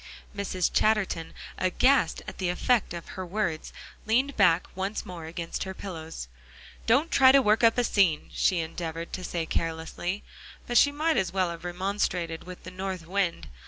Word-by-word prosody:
Mrs. 190 -3 -1
Chatterton, 210 -6 +1 0.3
aghast 185 +2 +2
at - - -8
the 185 -2 0
effect 220 +6 +1
of 170 -1 -7
her 185 - -5
words, 175 -4 -2 0.4
leaned 260 +5 +2
back 180 -4 +4
once 195 +3 -3
more 170 -3 -7
against 165 +1 -4
her 190 0 -6
pillows. 165 - -7 0.6
"Don't 280 +8 +3
try 260 -1 +7
to 275 - +7
work 220 -2 +3
up 230 +1 +5
a 245 - +3
scene," 190 -9 +2
she 180 -3 +2
endeavored 165 0 -5
to 185 - -4
say 170 -2 -2
carelessly. 165 +4 -3 0.4
But 240 - +4
she 285 - +5
might 310 +2 +1
as 185 -3 +1
well 185 -2 +1
have 170 0 -8
remonstrated 180 -2 -2
with 180 0 -10
the 185 - -8
north 185 -2 -5
wind. 185 -1 -1
185 Hz, 170 wpm, -27 LUFS, 170-215 Hz, 0.6 s, try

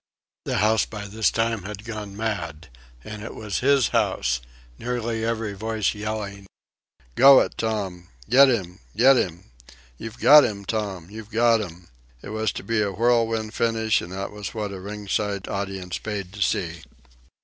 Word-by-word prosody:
The - - -1
house 110 +1 +3
by 105 -2 -7
this 110 +2 +1
time 115 -1 0
had 105 +3 -8
gone 105 -3 -6
mad, 85 - -4 0.3
and 105 -1 -8
it 115 - -7
was 105 -3 -3
his 135 -1 +3
house, - - 0 0.4
nearly 120 -2 -2
every 115 -2 -2
voice 110 +1 -1
yelling: 105 -2 -5 0.7
"Go 135 +1 +8
it, - - -2
Tom!" 100 -6 -3 0.2
"Get 135 +3 +7
'im! 95 -8 -2 0.2
Get 130 +4 +7
'im!" 90 - -3 0.5
"You've 115 +1 -7
got 150 0 +8
'im, 100 -4 -3
Tom! 100 -5 -3
You've 110 0 -9
got 115 0 +3
'im!" 90 -2 -9 0.3
It - - -8
was 110 -1 -1
to - - -6
be 115 +2 0
a 100 -1 0
whirlwind 115 0 +1
finish, 115 -1 +1
and 85 - -8
that 95 +1 -4
was 105 +1 -7
what 105 -2 -3
a 95 - -7
ringside 100 0 -3
audience 95 -3 -4
paid 100 -4 -5
to 105 - -8
see. 85 -4 0
105 Hz, 165 wpm, -24 LUFS, 100-115 Hz, 0.7 s, Go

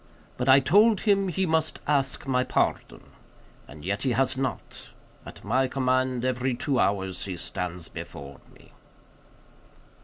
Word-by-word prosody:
But 125 +1 -2
I 130 +1 +8
told 205 - +4
him 200 -2 +2
he 190 +1 -1
must 160 -2 0
ask 140 -2 0
my 130 -2 +1
pardon. - - -1 0.6
As 75 - -12
yet 100 +8 -3
he 130 -2 0
has 135 +3 +2
not. 130 0 -5 0.4
At - - -12
my 130 +1 +1
command, 130 -1 0
every 130 0 -1
two 135 +1 -1
hours 95 -2 -1
he 95 -3 -5
stands 90 -1 -4
before 70 0 -9
me." - - -20
130 Hz, 145 wpm, -26 LUFS, 100-140 Hz, 0.6 s, I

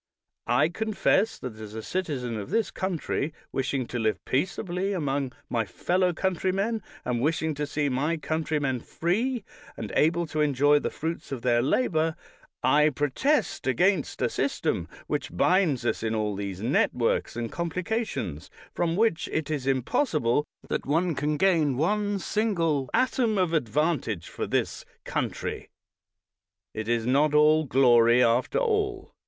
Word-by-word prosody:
I 140 +6 +3
confess 215 +2 +1
that 120 -4 -7
as 110 -1 -9
a 110 - -5
citizen 140 -10 -3
of 105 +3 -5
this 225 +3 0
country, 165 -4 -2 0.2
wishing 135 -1 -1
to 120 - -3
live 110 -1 +1
peaceably 185 +6 -1
among 140 -6 -1 0.2
my 115 -2 0
fellow 180 - 0
coun 190 +2 0
trymen, 195 +6 -1 0.2
and 120 -1 -1
wishing 160 +2 0
to 150 0 -3
see 150 0 -1
my 145 +5 0
countrymen 155 -4 -1
free, 215 - -1 0.3
and 110 - -5
able 170 +3 +3
to 155 -1 -2
enjoy 145 0 +4
the - - -2
fruits 165 -1 -5
of 130 -4 -4
their 120 -2 +3
labor, 160 - +1 0.5
I 150 +1 +5
protest 155 - 0
against 175 - +1
a - - +2
system - - -1 0.2
which 85 - -3
binds 165 - +3
us - - 0
in 110 0 -1
all 105 -2 -1
these 100 0 -5
networks 120 -2 +1
and 115 -1 -3
complications 170 - -3 0.2
from 170 -1 0
which 215 -4 +1
it 155 -1 -2
is 140 -4 -2
impossible 135 - +1 0.2
that - - -3
one 165 +4 +2
can 150 +1 -1
gain 155 -7 +3
one 205 +6 +1
single 170 - 0
atom 240 -4 +2
of 180 -3 +1
advantage 140 - 0
for - - -4
this - - -1 0.2
country. - - -3 1.0
It 110 0 -4
is 115 -1 +1
not 145 +4 +3
all 155 +1 +5
glory 120 -2 +5
after 120 - +2
all. 425 -5 -1
150 Hz, 150 wpm, -27 LUFS, 125-185 Hz, 1.0 s, I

